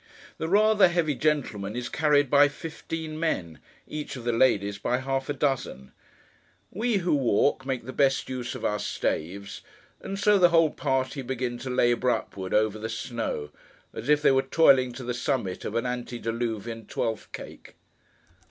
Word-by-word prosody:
The 160 - -2
rather 210 +1 +5
heavy 170 -4 +1
gentleman 125 -8 -1
is 125 0 -3
carried 150 -2 +2
by 145 +2 +6
fifteen 160 +1 -6
men; 85 - -2 0.3
each 150 -2 -5
of 125 - -8
the 120 - 0
ladies 105 -4 +2
by 125 - 0
half 135 +1 -2
a - - +1
dozen. 130 - -2 0.8
We 225 +2 0
who 180 - +2
walk, 135 0 +2
make 130 -3 -2
the 130 - -7
best 135 -1 +2
use 125 -2 -4
of - - -5
our 105 0 0
staves; 100 +4 -3 0.4
and 195 - -5
so 205 0 +4
the 175 -1 +6
whole 165 -2 +4
party 135 -1 -1
begin 125 -1 -3
to 130 +1 -6
labour 125 0 +2
upward 95 -5 -3
over 110 0 +2
the 110 +1 -4
snow,—as 115 - -6
if 150 0 +4
they - - +6
were 135 0 +4
toiling 135 -2 +4
to 130 +1 -8
the 125 0 -2
summit 120 -7 -2
of 105 - -4
an 115 - 0
antediluvian 115 -2 -4
Twelfth 110 -1 -3
cake. - - -10
130 Hz, 165 wpm, -26 LUFS, 115-150 Hz, 0.8 s, by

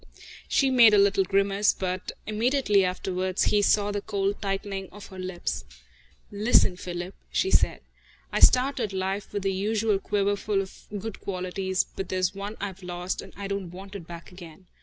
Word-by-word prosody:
She 270 -1 +3
made 235 -4 +7
a - - +5
little 200 -1 +4
grimace, 200 +2 +2
but 185 0 -3
immediately 215 -2 +2
afterwards 185 0 -1
he 210 - +3
saw 205 0 +3
the 205 0 -2
cold 200 -1 -1
tightening 195 -1 -3
of 205 0 -11
her 190 -1 -10
lips. 185 -1 -3 0.7
"Listen, 205 -2 +4
Philip," 180 +1 -5 0.2
she 380 - +1
said. - - +3 0.5
"I - - 0
started 250 -5 +4
life 190 +1 -2
with 205 -1 -3
the 195 -1 +1
usual 210 +1 +1
quiverful 200 0 0
of 190 -1 -7
good 215 +1 -6
qualities, 190 0 -2
but 195 - -4
there's 185 0 0
one 200 +2 -6
I've 195 -1 -5
lost, 180 0 -4
and 195 - -12
I 200 0 -4
don't 200 -2 -3
want 190 +3 -10
it 175 -5 -8
back 170 0 -10
again. 180 -1 -12
195 Hz, 170 wpm, -27 LUFS, 185-205 Hz, 0.7 s, made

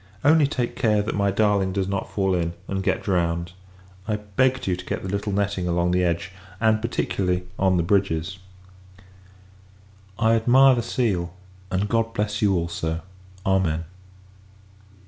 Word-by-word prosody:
Only 155 0 +5
take 125 -4 -2
care, 105 -5 +2
that 105 - -3
my 100 -1 +1
darling 100 -2 +1
does 95 -1 -1
not 100 0 -3
fall 95 -2 +1
in, 85 -2 -1
and 95 0 -2
get - - -1
drowned. 85 -2 0 0.6
I 105 - 0
begged 115 +6 0
you 95 - +1
to 90 - -8
get - - -4
the - - -4
little 100 +2 -2
netting 100 -2 -1
along 85 0 +1
the 90 0 +2
edge; 85 +1 -1 0.3
and, 110 -1 +2
particularly, 90 -6 -1 0.2
on 95 -1 +3
the 85 - +2
bridges. 95 -1 0 1.8
I 115 -1 +3
admire 130 +4 +6
the 120 - 0
seal; 95 -8 -1 0.3
and 95 +3 0
God 115 +1 0
bless 105 0 -1
you, 100 -3 +3
also! 85 -1 -2 0.4
Amen. 95 -4 +1
100 Hz, 155 wpm, -24 LUFS, 90-110 Hz, 1.8 s, admire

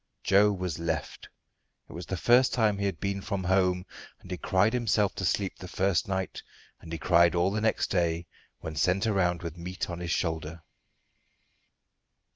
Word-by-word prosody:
Joe 100 +2 +5
was 90 -5 -3
left. 85 -1 -4 0.6
It - - -12
was 85 - -7
the 95 - -3
first 125 +7 +4
time 105 -4 +2
he 100 - 0
had 95 -5 -4
been 100 0 -2
from 100 -1 -3
home, 90 0 +2 0.3
and - - -13
he - - -3
cried 105 +4 +2
himself 110 -4 +1
to 95 - -4
sleep 95 +1 -1
the 90 - -8
first 95 -1 0
night, 95 -1 -3 0.4
and 80 - -12
he 80 - -3
cried 85 +1 +4
all 90 +2 +2
the 105 +1 -1
next 110 0 0
day 85 -1 0 0.4
when 80 - -6
sent 90 +6 +1
around 90 -5 +1
with 85 0 -6
meat 90 +1 -4
on 85 - -5
his 90 -1 -5
shoulder. 80 -1 -2
95 Hz, 180 wpm, -28 LUFS, 85-100 Hz, 0.6 s, Joe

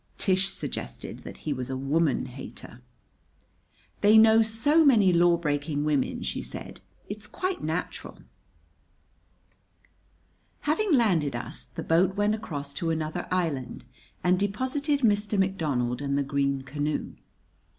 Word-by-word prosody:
Tish 190 0 +2
suggested - - -6
that - - -10
he 150 - 0
was 130 -1 -5
a 130 - -2
woman 145 +2 +1
hater. 125 -2 -10 1.2
"They 210 +2 +6
know 220 0 +7
so 225 +9 +3
many 215 - +5
lawbreaking 155 -4 +2
women," 150 -3 0
she - - -3
said, - - -7 0.3
"it's 210 +1 -7
quite 370 -1 -3
natural." - - -4 2.4
Having 330 +5 +1
landed 175 - +2
us, 120 - -6
the - - -7
boat 175 +3 +2
went 205 +1 +2
across 145 -10 -5
to 165 +3 -2
another 160 +1 -2
island 160 -8 -2 0.4
and 180 0 +3
deposited 260 +8 0
Mr. 210 -2 +2
McDonald 145 -11 0
and 140 0 -1
the 140 - +1
green 140 -1 0
canoe. 145 +2 -3
175 Hz, 125 wpm, -27 LUFS, 145-215 Hz, 2.4 s, know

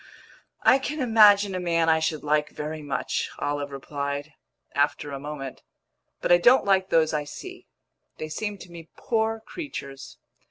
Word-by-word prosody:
"I 265 - +6
can 300 +3 -4
imagine 210 -5 +5
a 185 - -2
man 165 -2 +1
I 160 0 +4
should 160 -1 -2
like 150 0 +1
very 155 +1 -6
much," 145 -2 -2
Olive 145 0 -2
replied, 140 +1 -5 0.4
after 145 +1 0
a 140 - -5
moment. 140 -2 -7 0.6
"But - - 0
I 175 - +7
don't 250 +9 +5
like 190 -1 +2
those 160 -1 +3
I 150 -1 0
see. 145 - -10 0.5
They 155 - -5
seem 205 +6 -4
to 180 -2 -13
me 165 -1 -11
poor 225 -1 -1
creatures." 180 - -8
160 Hz, 160 wpm, -25 LUFS, 145-200 Hz, 0.6 s, I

